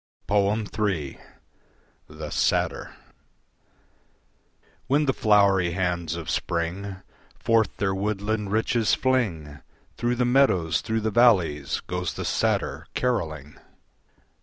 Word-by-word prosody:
III. 100 -6 0 0.9
The 75 0 -8
Satyr - - 0 1.9
When 145 +3 +2
the 135 - +2
flowery 100 -6 +3
hands 85 -3 -1
of 85 -2 -7
spring 95 +3 -3 0.3
Forth 115 -4 +1
their 95 -1 0
woodland 105 +1 -2
riches 110 0 +2
fling, 85 - -1 0.4
Through 120 +1 0
the 125 0 +1
meadows, 110 - +3
through 110 0 -2
the 110 0 -1
valleys 95 - +3
Goes 90 0 -4
the - - -4
satyr - - -1
carolling. 80 - -2
100 Hz, 100 wpm, -25 LUFS, 85-110 Hz, 1.9 s, flowery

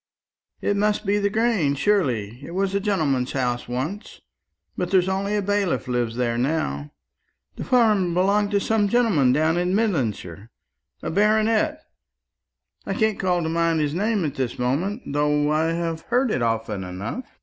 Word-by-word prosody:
"It 205 - 0
must 210 +1 0
be 205 +1 +2
the 200 0 +1
Grange, 215 -10 +1
surely. 125 - 0
It 170 +5 -8
was 195 0 0
a 200 - +1
gentleman's 155 -11 0
house 125 -2 -1
once; 135 - -5 0.6
but 180 - -2
there's 185 -1 +3
only 195 +2 -1
a 205 - 0
bailiff 195 - 0
lives 120 -2 -1
there 120 -1 -1
now. 120 - -1 0.6
The - - -6
farm 210 -8 +2
belongs 200 +3 +2
to 200 - +3
some 210 0 +1
gentleman 195 - +3
down 155 +5 +2
in 180 +2 +1
Midlandshire, 115 - -2 0.5
a - - -3
baronet; 220 - +2 1.0
I - - -3
can't 220 -4 +1
call 180 -2 +1
to 160 - -2
mind 165 0 +1
his 150 -1 0
name 205 +1 0
at 145 - -2
this 130 -3 -3
moment, 165 - -1
though 150 +1 +1
I 155 +1 +2
have 165 -1 -2
heard 245 0 0
it 130 - -1
often 115 -4 -1
enough. 95 - -5
170 Hz, 165 wpm, -23 LUFS, 130-205 Hz, 1.0 s, there's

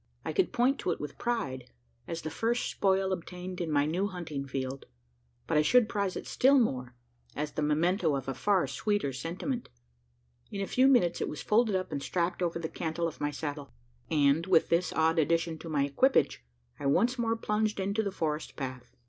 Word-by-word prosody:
I - - -2
could 380 - +2
point 255 +3 +2
to - - -2
it 175 - -1
with 150 -1 -7
pride 140 - -2 0.4
as 165 - -5
the 155 - -4
first 235 +2 0
spoil 190 0 +1
obtained 180 0 -6
in 170 - -2
my 145 -1 +3
new 175 +6 0
hunting 160 -7 -5
field; 135 0 -4 0.6
but - - +1
I - - +6
should 240 +8 +4
prize 200 -4 -1
it - - -5
still 275 +2 +4
more, 130 - 0 0.4
as 150 0 -2
the 155 - -3
memento 160 +2 +2
of 135 -1 -4
a 135 - -1
far 195 +3 +2
sweeter 140 +2 -1
sentiment. 180 - -4 0.8
In 200 - -5
a 195 - 0
few 255 +6 +3
minutes, 195 -11 +3
it - - -1
was 150 - -6
folded 215 -1 +3
up, 185 -2 -2
and 145 -2 -3
strapped 175 +4 -1
over 170 -1 0
the 165 -1 -3
cantle 165 +1 -2
of 160 - -8
my 145 - +1
saddle; 145 - -6 0.3
and, 150 +3 +3
with 175 -4 +4
this 170 +2 +2
odd 160 +1 +2
addition 165 +1 +1
to 165 - -8
my 145 -3 +2
equipage, 145 - +2 0.4
I 140 - -2
once 240 - +2
more 225 -1 +1
plunged 215 -1 -1
into 200 +3 0
the 200 -2 -2
forest 155 -4 -3
path. 130 -2 -6
170 Hz, 200 wpm, -30 LUFS, 145-205 Hz, 0.8 s, I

